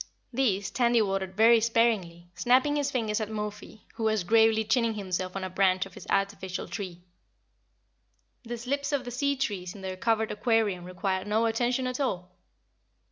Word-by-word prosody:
These 205 -6 0
Tandy 240 -1 +3
watered 195 -2 -1
very 230 +1 +7
sparingly, 215 -7 0
snapping 255 +8 +3
his 285 -1 0
fingers 225 -5 -1
at 215 - -3
Mo 210 -1 -3
fi, 210 +1 -14
who 225 -1 -3
was 215 -3 +1
gravely 220 +2 +4
chinning 230 0 +1
himself 185 -2 -3
on 195 - -3
a 185 - -3
branch 185 0 +2
of 195 - -13
his - - -11
artificial 195 -2 -1
tree. 180 -4 -6 1.4
The 240 0 -5
slips 280 +4 -2
of 280 -3 -1
the 245 - -5
sea 280 +3 0
trees 200 -9 -3
in 200 - -10
their 190 -1 -4
covered 220 +2 +1
aquarium 210 -5 +1
required 185 +2 -2
no 220 +2 +2
attention 240 +3 0
at 255 +1 -3
all. 180 -10 -2
220 Hz, 175 wpm, -28 LUFS, 190-235 Hz, 1.4 s, very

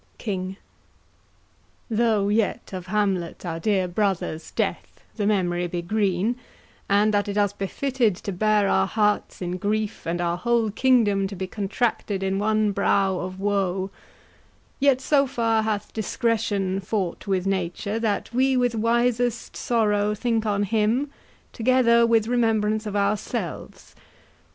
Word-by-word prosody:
KING. 190 -3 -4 1.3
Though 220 -3 +1
yet 210 -1 0
of 185 -1 -6
Hamlet 190 -4 -1
our 165 -1 -3
dear 190 0 +1
brother's 180 -4 -2
death - - -3
The 205 -3 -1
memory 180 -4 +1
be 175 0 -4
green, 205 +3 0 0.5
and 205 +2 +3
that 205 0 +1
it 200 0 -3
us 205 -1 +2
befitted 230 +2 0
To 200 +2 -6
bear 210 +2 +2
our - - +2
hearts 210 -3 0
in 180 +1 -3
grief, 210 +1 -2
and 170 +1 -1
our 175 0 0
whole 230 +2 +1
kingdom 210 -5 +3
To 195 - -7
be 190 +1 -3
contracted 200 0 -2
in 195 0 0
one 215 0 +2
brow 195 -1 +1
of 185 +1 -6
woe; 195 -1 -1 0.9
Yet 275 -2 +3
so 275 0 +3
far 230 -4 +1
hath 215 -2 -3
discretion 210 -4 -1
fought 190 -1 -3
with 190 -2 0
nature 195 +3 -2
That 220 0 -2
we 260 +1 +3
with 245 -1 +2
wisest 235 +1 0
sorrow 210 -3 +1
think 225 0 0
on 205 -1 +1
him, 225 +7 +1 0.4
Together 235 -1 +4
with 225 -2 +3
remembrance 220 -3 +1
of 205 - -4
ourselves. 200 +1 -3
210 Hz, 140 wpm, -24 LUFS, 195-225 Hz, 1.3 s, Together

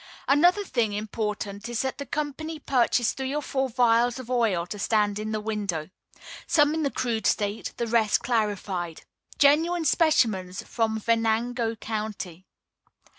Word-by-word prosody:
Another 350 +8 +4
thing 235 - 0
important 210 0 -4
is 240 +1 -1
that 265 +1 -3
the 280 - -5
company 305 +2 -3
purchase 250 -4 +1
three 265 +1 -3
or 300 - 0
four 265 -1 -1
vials 240 0 +3
of 255 -1 -8
oil 220 -9 +1
to 205 +3 -7
stand 210 -1 +1
in 215 0 -4
the 215 - -1
window 200 -7 -3 0.6
some 295 -1 +4
in 320 - -1
the 285 - +1
crude 230 -5 -1
state, 205 0 -1
the 235 - -1
rest 225 -2 +2
clarified. 200 -7 -2 0.3
Genuine 320 +4 +3
specimens 225 - +2
from 220 -2 -1
Venango 230 +1 0
County. 210 -5 -5
230 Hz, 145 wpm, -26 LUFS, 210-265 Hz, 0.6 s, Another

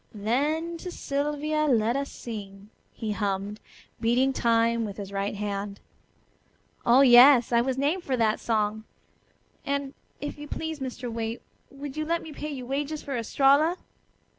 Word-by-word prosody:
'Then 295 +11 -1
to 360 - -7
Sylvia 295 0 -1
let 235 -3 +2
us 275 0 -2
sing,'" 205 -2 -8 0.2
he 220 -2 -4
hummed, 205 0 -2 0.4
beating 245 +4 +2
time 230 -1 +2
with 205 -2 -5
his 200 -2 -7
right 200 +1 -2
hand. 200 0 -4 1.0
"Oh, 245 +3 +6
yes, 250 -1 +8
I 235 0 +4
was 260 +1 -1
named 300 +7 0
for 260 -2 -1
that 220 -2 +2
song. 215 -1 -1 0.8
And, 280 -1 -2 0.3
if 290 0 -6
you 295 - -7
please, 320 +1 -4
Mr. 255 -1 -5
Waite, 225 0 -4 0.3
would 275 +1 -8
you 310 - -1
let 335 +1 0
me 315 - -9
pay 300 +1 -5
you 265 -4 -6
wages 290 +4 -3
for 275 - -4
Estralla?" 280 +8 +3
255 Hz, 155 wpm, -27 LUFS, 220-290 Hz, 1.0 s, yes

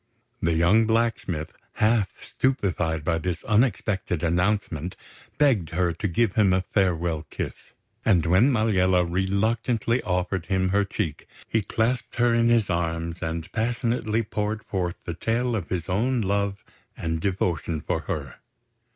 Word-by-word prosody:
The 85 -1 +2
young 100 +7 +4
blacksmith, 110 -8 0 0.2
half 110 -3 +1
stupefied 90 - 0
by 80 +1 0
this 90 +1 -3
unexpected 105 - +1
announcement, 90 -1 0 0.4
begged 120 - +3
her 85 0 0
to 100 +5 -2
give 100 +3 +1
him 100 -4 +4
a 95 - +2
farewell 85 -5 0
kiss; - - -6 0.3
and 90 -7 +3
when 95 +11 +4
Maliella 95 -6 +3
reluctantly 110 +6 0
offered 90 -1 -1
him 95 -1 +1
her 100 +1 +2
cheek, 80 -5 -4 0.2
he 110 - +1
clasped 115 +4 -1
her 120 0 +3
in 115 0 +3
his 115 -3 +3
arms 85 0 -2
and 80 0 -4
passionately 115 -1 0
poured 105 0 -3
forth 90 -3 -2
the 85 - -3
tale 115 +7 0
of 95 -7 -4
his 85 -3 -2
own 115 +7 +1
love 100 0 -1 0.3
and 80 -1 -2
devotion 85 -4 -1
for - - -2
her. - - -5
95 Hz, 140 wpm, -25 LUFS, 85-110 Hz, 0.4 s, young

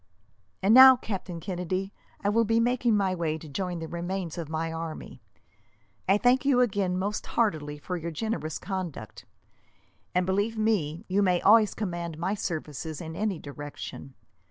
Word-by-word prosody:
"And 200 +3 +5
now, 260 +1 +11
Captain 195 -7 -5
Kennedy, 185 +2 -3 0.3
I 200 - +2
will 230 +2 +3
be 225 +1 +2
making 240 -1 +2
my 195 -2 +1
way 165 -3 -1
to 160 - -11
join 175 +5 -3
the 165 -1 -5
remains 175 0 -4
of 165 -3 -5
my 160 +1 -2
army. 165 -1 -7 0.9
I 195 - +6
thank 245 +4 +3
you 275 -3 +3
again, 200 -6 +1
most 205 +3 -2
heartily, 155 -10 0
for 180 +5 -4
your 170 0 -4
generous 160 -3 -3
conduct; 180 - -6 0.9
and, 180 0 +3
believe 205 +4 0
me, 200 -5 0
you 195 +2 +1
may 180 -3 +3
always 215 0 +5
command 175 -5 -4
my 180 +5 -1
services 160 -5 -4
in 160 -1 -7
any 205 -1 -1
direction. 145 -2 -8
185 Hz, 160 wpm, -27 LUFS, 160-210 Hz, 0.9 s, now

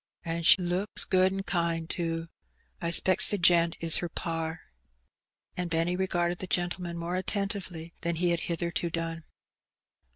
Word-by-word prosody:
'/An' 165 0 -3
she 180 - +7
looks 180 +3 +3
good 185 0 +3
an' 195 0 -4
kind, 170 -3 -1
too. 165 -1 -3 0.5
I 170 - -1
specks 185 +2 +5
the 205 - 0
gent 170 -2 +4
is 165 -1 +2
her 175 - -3
par.'' 165 0 -4 0.9
And 180 -1 -3
Benny 165 +2 0
regarded 175 -2 -1
the 185 - -6
gentleman 175 -1 -2
more 170 +1 -3
attentively 185 -4 -3
than 170 0 -1
he 175 +1 +1
had 170 - 0
hitherto 170 0 -2
done. 165 0 -4
170 Hz, 155 wpm, -28 LUFS, 165-180 Hz, 0.9 s, she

